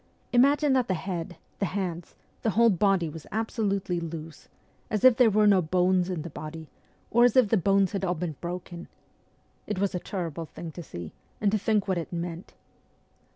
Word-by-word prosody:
Imagine 280 +3 +4
that 255 -2 +2
the 185 - 0
head, 175 -1 -4 0.2
the 195 - +1
hands, 175 -3 -4 0.3
the 225 - +1
whole 230 +2 +4
body 195 -2 +2
were 160 +1 -7
absolutely 200 -4 -1
loose, 165 -1 -8 0.4
as 215 -2 -1
if 255 -2 +8
there 245 -1 +5
were 215 0 +3
no 200 -3 +5
bones 180 +2 +2
in 175 -5 -3
the 170 - -6
body, 155 +2 -7 0.5
or 240 +1 +5
as 245 -2 +4
if 255 -5 +5
the 225 - +4
bones 195 0 +3
had 195 -2 -3
all 180 -1 0
been 160 -2 -4
broken. 175 0 -6 0.8
It 210 - -2
was 195 0 0
a 180 - -1
terrible 170 -4 -4
thing 165 +1 -8
to 175 - -8
see, 85 - -8 0.3
and 205 -2 +2
to 215 - +1
think 210 0 +1
what 190 -2 0
it 165 - -6
meant. 170 0 -5
185 Hz, 195 wpm, -27 LUFS, 170-210 Hz, 0.8 s, if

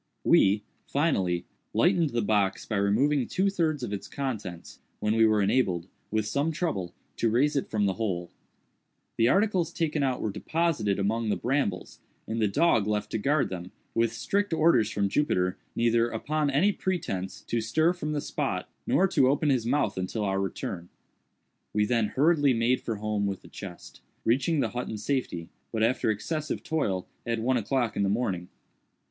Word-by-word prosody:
We, 100 +2 +4 0.2
finally, 95 - +1 0.3
lightened 175 -4 +3
the 120 -3 -1
box 100 -2 +1
by 110 - -2
removing 120 +7 +2
two 195 +1 +1
thirds 155 -7 0
of 105 - -3
its 100 - -5
contents, 105 -11 -5 0.2
when 105 0 +1
we 115 0 +5
were 105 -2 +3
enabled, 95 -6 +1 0.2
with 110 0 0
some 140 +8 0
trouble, 105 - -2 0.2
to 115 - +2
raise 140 +7 +2
it 140 - -1
from 105 -2 +1
the 95 - +1
hole. 90 -5 -3 0.9
The 115 - +4
articles 190 - +2
taken 160 -3 -1
out 130 -2 0
were 110 - -2
deposited 120 - 0
among 110 +3 0
the - - +2
brambles, 125 -8 -1 0.3
and 110 +1 -2
the 105 - +4
dog 105 -1 +3
left 105 -1 -1
to - - -1
guard 140 +6 +2
them, 90 -1 -6 0.2
with 115 0 +2
strict 200 - -1
orders 155 -9 +4
from 100 -1 0
Jupiter 90 -7 +1 0.2
neither, 115 0 +3
upon 150 +6 -1
any 155 +9 +3
pretence, 170 - -3
to 115 - -1
stir 160 +9 +2
from 155 -4 -4
the 145 - -1
spot, - - -2 0.2
nor 190 - +4
to 130 - +4
open 145 +1 +2
his 120 -4 +1
mouth 140 -2 +1
until 100 +4 -2
our 95 -1 0
return. 90 -2 -4 0.8
We 105 0 +2
then 115 -1 +1
hurriedly 145 +2 +3
made 120 +3 +2
for 115 - -3
home 105 -1 -1
with 95 -1 -4
the - - -14
chest; 95 -4 -10 0.2
reaching 140 +6 +2
the - - 0
hut 125 +1 -4
in 110 - -4
safety, 105 -8 -2 0.2
but 110 -1 0
after 115 0 +2
excessive 150 +9 -2
toil, 145 - -1 0.2
at 115 -1 -1
one 125 +3 +2
o'clock 120 +1 0
in - - 0
the 100 - +2
morning. 95 -5 -1
115 Hz, 180 wpm, -28 LUFS, 100-145 Hz, 0.9 s, we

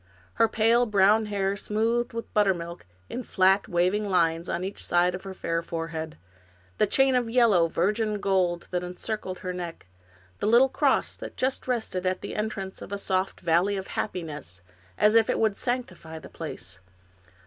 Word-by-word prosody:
Her 225 - +7
pale 230 +2 +3
brown 210 +1 +4
hair 200 -1 -1
smoothed 225 +4 0
with 230 0 -7
buttermilk 175 - 0 0.2
in 250 - -5
flat, 195 -3 +2
waving 190 +3 +1
lines 170 -2 +1
on 175 - -2
each 195 +2 -5
side 175 +1 +2
of 185 +2 -7
her 190 - -6
fair 165 -2 -2
forehead. 165 -1 -5 0.6
The 215 - +4
chain 270 +5 +3
of 245 -2 +1
yellow, 225 -8 +4
virgin 210 +5 0
gold 185 -3 0
that 180 -1 0
encircled 185 +1 -4
her 180 - -2
neck; 175 -2 -6 0.5
the - - -1
little 240 +4 +6
cross - - +1
that - - -9
just 260 +1 -1
rested 220 -7 -1
at 185 0 -1
the - - -6
entrance 210 -3 -4
of - - -9
a 200 - -2
soft 190 -1 -1
valley 175 +4 +2
of 190 - -6
happiness, 150 - -5 0.3
as 210 - +4
if 225 -1 +4
it - - +1
would 220 -2 +2
sanctify 185 -11 -4
the - - -11
place. 100 - -8
195 Hz, 170 wpm, -26 LUFS, 175-220 Hz, 0.6 s, Her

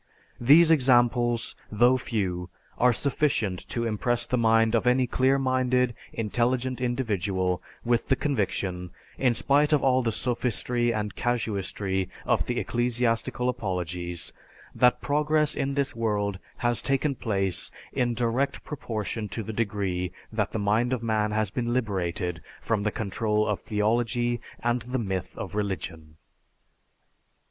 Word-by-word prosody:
These 155 +7 +7
examples, 120 -4 +3 0.2
though 120 +4 +5
few, 95 -8 -2 0.3
are 125 0 +5
sufficient 120 -8 0
to 115 -1 -1
impress 115 +2 0
the - - 0
mind 115 -1 +3
of 115 +1 +2
any 125 +1 +4
clear 130 +2 +2
minded, 130 -2 +1 0.2
intelligent 120 +3 -1
individual 100 -7 0 0.2
with 120 0 +1
the 135 - +3
conviction, 95 -10 -2 0.3
in 125 -3 +3
spite 145 +5 +3
of 150 -3 +3
all 130 -1 +4
the 115 -2 0
sophistry 120 0 0
and 105 -2 -2
casuistry 100 -5 -1 0.2
of - - +1
the - - -1
ecclesiastical 120 0 0
apologies, 90 -6 -3 0.4
that 125 0 +3
progress 150 +1 +2
in 135 0 -1
this 140 -4 -1
world 105 -4 -1 0.2
has 120 -1 0
taken 140 +1 +1
place 100 -7 -1 0.2
in 120 -2 0
direct 120 +3 0
proportion 110 - -4
to 110 +4 -4
the 110 - -5
degree 100 -5 -1 0.2
that 105 -2 0
the - - -2
mind 110 +4 +1
of 120 -2 -2
man 110 -2 +1
has 105 -2 -1
liberated 95 -8 -1
itself - - -18
from 110 -3 +1
the 105 +1 0
control 105 +1 0
of 105 -4 -1
theology 120 +3 0 0.2
and 120 +1 +1
the 125 +3 -3
myth 95 -6 -3
of - - -6
religion. 90 -7 -4
115 Hz, 135 wpm, -27 LUFS, 105-125 Hz, 0.4 s, These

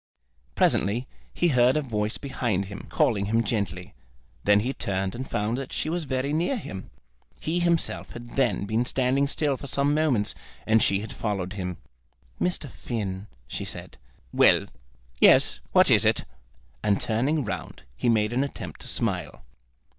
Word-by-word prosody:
Presently 115 +7 +2 0.2
he 175 - +1
heard 125 0 +4
a 155 - 0
voice 110 -4 -1
behind 120 -8 -1
him, 100 +1 -9
calling 100 -5 +2
him 115 +2 +2
gently. 100 -5 -3 0.5
Then 105 0 +5
he 130 +5 -1
turned 95 -4 -2
and 130 +2 -6
found 110 +5 -1
that 135 - -6
she 155 - -2
was 170 -1 -2
very 130 +1 -1
near 175 - +1
him. 95 - -7 0.5
He 165 +3 -1
himself 170 -2 +1
had 120 0 -9
then 125 -7 +1
been 110 +3 +1
standing 130 +2 +1
still 145 -1 0
for 140 - -7
some 140 +2 +1
moments, 145 -9 +1 0.3
and 110 0 +4
she 100 0 +3
had 110 - -7
followed 100 -4 -2
him. 90 -3 -4 0.6
"Mr. 175 -4 0
Finn," 105 -6 -4 0.2
she - - -4
said. - - -7 0.3
"Well; - - +5 0.5
yes: - - +5
what - - +5
is - - +6
it?" - - +2 0.6
And 100 -2 +2
turning 130 +6 0
round 100 - -5
he 90 - 0
made 110 -1 +2
an 130 +3 +2
attempt 140 - -6
to - - -4
smile. - - -2
120 Hz, 160 wpm, -26 LUFS, 105-140 Hz, 0.6 s, is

